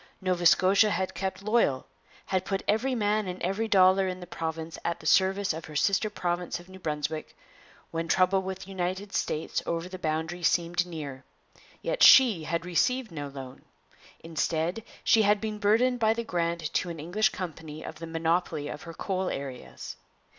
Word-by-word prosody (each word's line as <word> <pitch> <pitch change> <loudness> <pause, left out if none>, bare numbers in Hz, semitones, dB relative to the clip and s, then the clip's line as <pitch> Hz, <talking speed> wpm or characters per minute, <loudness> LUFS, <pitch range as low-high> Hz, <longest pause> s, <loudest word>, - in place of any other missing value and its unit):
Nova 180 -2 +2
Scotia 195 +5 +5
had 190 -2 -1
kept 190 0 -4
loyal; 215 - +2 0.4
had 185 -1 0
put 195 0 -2
every 245 +5 +1
man 210 -2 +1
and 180 0 -5
every 195 +5 0
dollar 190 -1 +5
in 185 0 -4
the 180 - -8
province 160 -1 -5
at 170 - -2
the - - -14
service 190 +2 +3
of 160 0 -7
her 155 - -11
sister 200 +7 +2
province 175 -3 -2
of 175 - -14
New 190 0 -12
Brunswick, 155 -1 -4 0.5
when 165 0 -2
trouble 185 +2 +3
with 190 0 -5
the 195 - -10
United 190 +2 -3
States 155 +1 -1
over 170 +1 -2
the 185 0 -8
boundary 160 +2 -2
seemed 175 +1 +1
near. 145 -6 -7 0.6
Yet - - -2
she 225 -12 +8
had 170 +1 -2
received 235 +7 +1
no 145 -3 -5
loan; 135 -2 -9 0.6
instead, 165 +4 -1 0.2
she 225 - +5
had 210 0 +4
been 215 -1 -4
burdened 235 +4 +3
by 220 -1 +3
the 235 - -2
grant 170 -5 -2
to 180 - 0
an 165 -2 -6
English 195 +8 +1
company 160 -5 -7
of - - -8
the 165 - -6
monopoly 165 -2 -1
of - - -7
her 165 -1 -9
coal 190 +1 -2
areas. 125 - -7
180 Hz, 180 wpm, -28 LUFS, 165-200 Hz, 0.6 s, she